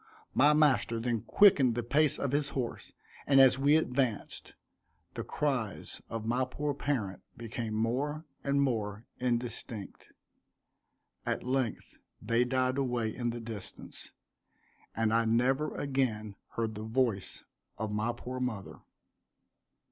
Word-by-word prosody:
My 145 +3 +5
master 145 -6 +3
then 115 -1 -1
quickened 140 - +5
the 120 - -1
pace 145 +5 +2
of 140 - -1
his 145 0 +1
horse; 120 -3 -4 0.4
and 135 -1 +6
as 130 0 +7
we 145 +2 +5
advanced, 130 -7 -1 0.6
the - - -4
cries 130 -9 -2
of 115 -1 -4
my 120 +3 +1
poor 145 +3 -2
parent 125 -9 -2 0.2
became 115 -1 -4
more 140 +8 -1 0.2
and 140 0 +2
more 110 -4 -2
indistinct 120 -4 -3 1.1
at - - -2
length 130 -2 -2 0.2
they 115 +3 +2
died 130 +1 +1
away 120 -5 -1
in 120 -2 -1
the 120 0 -4
distance, 110 -4 -9 0.8
and 110 0 +1
I 115 0 +3
never 130 +6 +2
again 120 -7 -1 0.2
heard 115 -1 -1
the 105 - -6
voice 110 -4 -1 0.3
of 110 -1 -3
my 110 +3 0
poor 125 +2 -6
mother. 115 -6 -4
120 Hz, 130 wpm, -31 LUFS, 115-135 Hz, 1.1 s, as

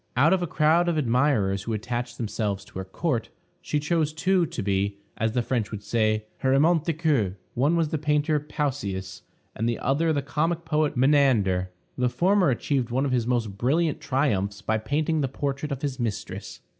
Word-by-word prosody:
Out 155 +7 +5
of 190 - +2
a 175 - -1
crowd 160 +3 +3
of 165 - 0
admirers 120 -7 +2
who 115 +3 -3
attached 120 +3 -3
themselves 105 -3 -2
to - - -9
her - - -3
court, 120 - -2 0.3
she 155 -4 -1
chose 155 0 0
two 180 +1 +2
to 150 -9 -5
be, 100 0 0 0.2
as 110 0 0
the 120 -1 +1
French 115 -4 -1
would 105 -2 -7
say, 110 -1 +1
her 130 0 +2
amants 160 +2 +3
de 165 - +2
coeur. 140 - 0 0.2
One 145 +7 +2
was 165 -2 +1
the 155 -1 -2
painter 150 +1 +1
Pausias; 140 -10 -3 0.4
the 115 0 +1
other 160 +4 +1
the 145 -3 0
comic 160 +4 -1
poet 155 -3 0
Menander. 120 -10 +3 0.3
The 125 0 +2
former 185 +5 +3
achieved 130 0 0
one 130 +4 0
of 135 - -1
his 120 -2 +1
most 110 -5 -1
brilliant 155 +6 +1
triumphs 105 -7 0
by 110 0 0
painting 150 +7 0
the 135 - +1
portrait 140 +2 -3
of 140 0 -4
his 140 -2 -2
mistress. 115 -4 -4
135 Hz, 190 wpm, -25 LUFS, 110-155 Hz, 0.4 s, Out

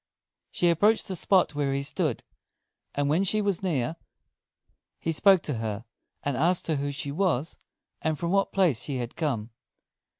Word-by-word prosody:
She 175 - +1
approached 210 +7 +3
the 190 - -3
spot 185 0 +3
where 140 -2 0
he 140 - -1
stood; 150 -2 -1 0.7
and 145 0 +1
when 160 +6 +2
she 215 +3 +2
was 200 -4 0
near, 160 -5 -1 1.0
he 165 - -2
spoke 190 +2 +5
to 135 -7 -2
her, 110 0 -4 0.4
and 145 -2 -1
asked 175 +7 +2
who 145 -3 -1
she 140 0 -4
was, 165 -3 0 0.4
and 155 -1 0
from 170 +3 -2
what 195 0 +2
place 170 - +2
she 140 -3 -3
had 120 -1 -5
come. 125 -9 -2
155 Hz, 165 wpm, -27 LUFS, 140-185 Hz, 1.0 s, spoke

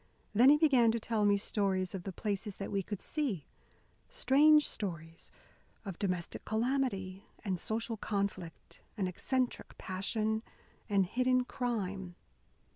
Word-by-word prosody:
Then 240 +6 +7
he 295 - +7
began 260 -7 +5
to 235 - 0
tell 220 -2 0
me 205 0 +4
stories 195 -2 -1
of 185 -2 -5
the 195 - -3
places 200 +1 -3
that 195 - -6
we 200 - +1
could 200 +1 -6
see 255 - -2 0.6
strange 300 +3 +5
stories 165 -5 -5 0.5
of 195 -4 -6
domestic 180 -4 -2
calamity, 220 -5 -1 0.2
and 185 -3 -1
social 225 +3 -2
conflict, 200 -5 -4 0.2
and 195 -3 0
eccentric 255 +7 -2
passion, 215 +4 -1 0.5
and 200 -2 +3
hidden 255 +5 +2
crime. 200 -8 -3
205 Hz, 130 wpm, -33 LUFS, 190-245 Hz, 0.6 s, Then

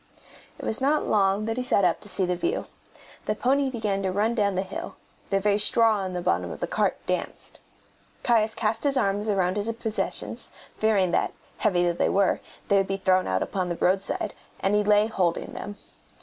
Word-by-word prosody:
It - - -8
was 220 - 0
not 295 +3 +2
long 200 0 +2
that 225 +1 -2
he - - 0
sat 205 -6 +2
up 170 - +1
to 205 - -10
see 190 0 0
the 180 0 0
view. 350 - -2 0.6
The 215 - 0
pony 270 +4 +1
began 215 -5 -2
to 190 -1 -1
run 210 +5 +1
down 205 -4 +1
the 190 - 0
hill; 330 - -7 0.3
the 195 - +2
very 205 +1 +2
straw 215 -1 +3
in 185 - -4
the 180 -1 -3
bottom 90 - 0
of - - -7
the - - -1
cart - - 0
danced. - - -4 0.6
Caius 225 -2 +2
cast 220 +1 -1
his 280 -2 +3
arms 205 -2 0
about 190 -2 +1
his 210 +2 0
possessions, 225 -1 -2 0.3
fearing 205 -5 +2
that, - - +1 0.3
heavy 180 -5 +2
though 175 -1 +2
they - - +1
were, 195 -1 +2 0.3
they 200 - +4
would 195 -1 +2
be 195 - -1
thrown 185 -1 +2
out 95 0 +1
upon 185 -2 -2
the 175 - -1
roadside, 190 +2 0 0.3
and 195 - +1
he 210 0 +3
lay 210 0 +4
holding 185 -6 -1
them. 205 0 -7
205 Hz, 205 wpm, -26 LUFS, 190-220 Hz, 0.6 s, they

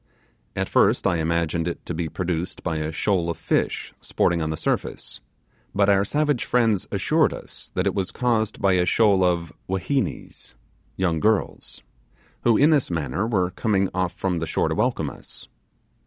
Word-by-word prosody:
At - - -1
first - - +3
I 90 -2 +2
imagined 85 +1 0
it 85 - -5
to - - -4
be 80 0 -2
produced 85 +1 -3
by 85 -3 -1
a 75 0 -2
shoal 85 +1 0
of 85 - -3
fish - - -1
sporting 85 -1 +1
on 80 - -1
the 80 - -2
surface, - - -3 0.5
but 100 0 +3
our 100 -1 +4
savage 145 +3 0
friends 115 -6 +1
assured - - +2
us - - -11
that 90 - 0
it 100 - +1
was 95 -2 -1
caused 115 -4 0
by 100 -1 +3
a 90 -1 +3
shoal 100 -4 +4
of 85 -2 0 0.2
'whinhenies' 110 +9 -2 0.4
(young 85 -4 0
girls), 110 +3 0 0.6
who 115 -2 +4
in 150 +3 +5
this 145 -4 +2
manner 85 - -1
were 95 -6 +1
coming 100 -4 +1
off 90 -1 -1
from 90 -3 -1
the 80 - -3
shore - - 0
to - - 0
welcome - - 0
is. - - -10
95 Hz, 175 wpm, -24 LUFS, 85-105 Hz, 0.6 s, in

